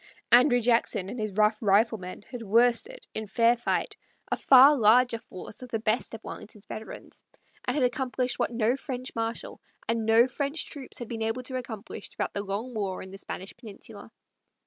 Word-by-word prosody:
Andrew 245 +1 +6
Jackson 230 -5 +1
and 245 - -6
his 215 -1 -2
rough 215 +1 +3
riflemen 205 -2 +1
had 245 -2 -6
worsted, 235 - +1
in 220 0 -4
fair 230 +3 +3
fight, 240 - -2 0.3
a - - +3
far 270 +2 +7
larger 235 0 +4
force 185 +2 -11
of 250 - -9
the 225 - -1
best 225 +1 -1
of 225 - -11
Wellington's 210 -1 -10
veterans, 220 - -9 0.4
and 250 - -1
had 290 - +1
accomplished 250 0 -1
what - - +1
no 235 +1 +1
French 255 -1 -6
marshal 225 0 -4 0.3
and 230 -1 -1
no 225 +2 +6
French 280 +4 -3
troops 275 -3 -9
had 240 - -6
been 225 -1 -5
able 225 +3 -1
to 255 +1 -5
accomplish 225 -5 -6
throughout - - -4
the 200 - -2
long 205 +5 -4
war 200 -4 -3
in 190 - -11
the 195 - -9
Spanish 190 0 -7
peninsula. 215 -2 -11
230 Hz, 185 wpm, -27 LUFS, 215-250 Hz, 0.4 s, far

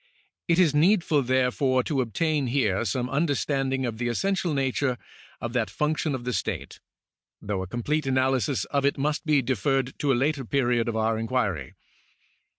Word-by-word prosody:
It 170 -2 +3
is 175 -6 +4
needful, 165 -1 +3
therefore, 130 0 +1
to 135 -1 0
obtain 145 +5 0
here 120 -6 +1
some 120 +4 -1
under 145 +3 +1
standing 135 -2 -1
of 115 -2 -4
the 120 - -1
essential 190 +7 0
nature 135 -2 0 0.4
of 120 0 -5
that 120 -3 0
function 150 -1 -1
of 125 - -6
the 125 0 -2
state, - - -3 0.6
though 100 -2 -3
a 95 - -5
complete 140 - -2
analysis 130 0 +1
of 140 -1 -1
it 140 +1 +2
nuist 150 +4 -1
be 145 -3 +3
deferred 130 +2 0
to 145 - +1
a - - +3
later 140 +2 0
period 120 -2 +1
of 115 - -2
our 110 0 +1
inquiry. 105 - -2
130 Hz, 170 wpm, -26 LUFS, 120-145 Hz, 0.6 s, is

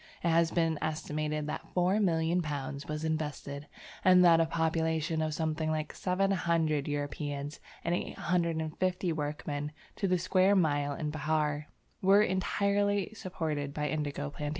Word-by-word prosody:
It 170 - +2
has 165 0 +4
been 165 -2 +1
estimated 155 -1 -2
that 150 - -5
four 180 +3 +3
million 170 -2 +2
pounds 140 -2 -4
was 150 +1 -3
invested, 150 -2 -3 0.4
and 185 -1 +7
that 165 -1 +7
a 165 - +3
population 160 -1 0
of 155 -1 -1
something 160 0 -1
like 155 -1 -2
700 170 -6 +1
Europeans 145 0 -3 0.2
and 170 - 0
850 170 +1 -1
workmen 145 -1 -3 0.3
to 195 - 0
the 185 0 +3
square 185 +2 +3
mile 145 -5 +2
in 150 0 -3
Behar, 150 -1 0 0.3
were 195 +2 +6
entirely 200 +1 +1
supported 155 -8 -3
by 150 -1 -1
indigo 145 -2 -2
plantations. 145 0 -4
160 Hz, 140 wpm, -31 LUFS, 150-180 Hz, 0.4 s, and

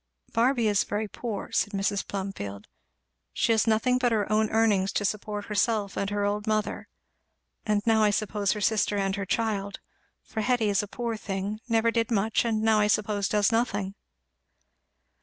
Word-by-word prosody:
"Barby 235 0 +2
is 205 -1 +3
very 210 +1 -3
poor," 210 0 -5
said 205 - 0
Mrs. 195 0 -1
Plumfield; 145 - -5 0.7
"she 235 - +1
has 225 0 +3
nothing 240 +3 +2
but 245 -1 +2
her 210 -3 +1
own 215 0 +2
earnings 210 -4 +2
to 205 - 0
support 210 0 -3
herself 210 -1 0
and 200 - -1
her 205 0 -1
old 205 +1 -2
mother, 215 -1 -1 0.8
and 210 -1 +1
now 225 -1 +4
I 210 - +5
suppose 205 -1 0
her 210 - -5
sister 210 0 +1
and 195 -1 0
her 200 -2 -4
child; 200 -3 -1 0.4
for 220 - -4
Hetty 235 -1 +1
is 200 -1 +2
a 205 - -6
poor 235 +2 -3
thing 200 +1 -4
never 230 0 +3
did 230 -1 0
much, 220 0 +1
and 220 -2 0
now 220 -1 +4
I 210 - +3
suppose 205 -1 +1
does 210 +1 +2
nothing." 205 -4 0
210 Hz, 175 wpm, -27 LUFS, 200-225 Hz, 0.8 s, I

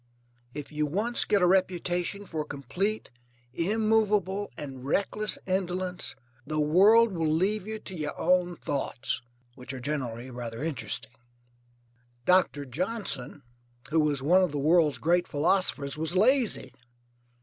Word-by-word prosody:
If 150 0 -6
you 150 0 -1
once 215 +10 0
get 205 -3 +2
a - - +7
reputation 180 +1 0
for 160 -5 -3
complete, 175 - -3 0.4
immovable, 210 +1 +1
and 135 -3 -7
reckless 200 +8 0
indolence 185 -3 -2 0.3
the 155 +2 -3
world 200 +9 +5
will 165 -4 0
leave 195 +5 0
you 220 0 -4
to 190 -3 -9
your 150 -3 -4
own 180 -1 +2
thoughts, 140 -5 -2 0.3
which 125 +1 -9
are 130 - -6
generally 130 -3 -4
rather 120 +1 -6
interesting. 120 -6 -2 1.1
Doctor 180 -6 +3
Johnson, 175 - -3 0.5
who 160 - +3
was 145 -3 +1
one 180 +6 +5
of 180 -4 +1
the 145 - -3
world's 155 +1 +3
great 175 +2 +2
philosophers, 150 -2 +1
was 160 +3 -2
lazy. 245 +3 +2
175 Hz, 130 wpm, -28 LUFS, 145-195 Hz, 1.1 s, a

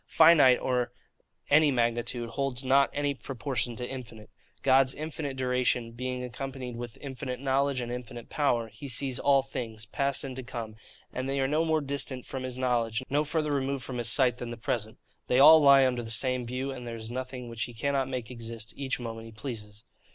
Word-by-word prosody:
Finite 155 -5 +7
or 125 -2 0 0.6
any 150 +1 +6
magnitude 120 -1 0
holds 135 0 -2
not 135 +1 +4
any 145 0 0
proportion 130 -2 -3
to 125 +1 -4
infinite. 115 -5 -8 0.3
God's 135 -1 +4
infinite 150 -3 -4
duration, 125 -2 +1
being 125 +1 -4
accompanied 125 0 -6
with 120 -1 -7
infinite 130 -2 -5
knowledge 135 0 +1
and 120 0 -4
infinite 120 -1 -7
power, 120 -6 +1
he 140 - -9
sees 130 0 -2
all 140 -1 +4
things, 115 -5 -6
past 140 +4 -1
and 135 -2 -5
to - - -3
come; 115 -3 -6 0.4
and 130 +1 -3
they 135 0 0
are 135 - +2
no 155 +3 +2
more 160 -1 +2
distant 140 -2 -2
from 130 - -5
his 130 -1 -3
knowledge, 120 -2 0
no 145 +2 +3
further 155 0 -1
removed 135 -1 -1
from 125 -1 -5
his 115 -1 0
sight, 125 -1 +3
than 120 - -5
the 120 - -6
present: 110 -1 -3 0.3
they 125 - +2
all 155 +3 +9
lie 140 -2 +7
under 125 -2 0
the 115 - -7
same 125 +1 0
view: 130 +3 -3
and 125 -2 -7
there 115 0 -5
is 110 +1 -7
nothing 130 0 -5
which 115 -1 -3
he 120 - -10
cannot 135 +2 0
make 125 -3 -4
exist 115 -2 -7
each 135 -2 -2
moment 115 -1 -6
he - - -11
pleases. 110 -2 -8
130 Hz, 200 wpm, -29 LUFS, 120-135 Hz, 0.6 s, all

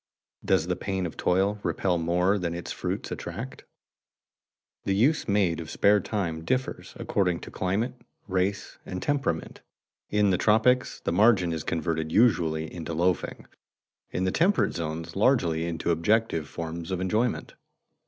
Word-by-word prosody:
Does 95 -4 +2
the 90 +1 -1
pain 95 -1 -2
of 85 - -5
toil 100 +3 +1
repel 90 -4 0
more 90 +4 +2
than 85 -2 -2
its 85 - -5
fruits - - -3
attract? - - -6 1.2
The 95 - 0
use 135 +10 +2
made 100 -6 +2
of 80 -2 -7
spare 105 +4 +4
time 85 -5 -3
differs 130 +6 -2
according 90 -4 0
to - - -9
climate, 100 +7 -1 0.3
race, 95 +1 -1
and 90 - -5
temperament. 140 - -1 0.5
In 105 -1 +3
the 90 - +1
tropics 125 +4 +3
the - - -1
margin 95 -3 +4
is 80 -3 -3
converted 80 -1 -2
usually 80 -8 +2
into 85 -1 -5
loafing, 90 +2 0 0.6
in 90 - -2
the 95 - +1
temperate 185 - +2
zones 80 -1 -4
largely 90 -8 +2
into 85 0 -1
objective 85 -1 +1
forms 85 +1 -6
of 95 -2 -1
enjoyment. 110 +6 0
90 Hz, 145 wpm, -27 LUFS, 85-105 Hz, 1.2 s, spare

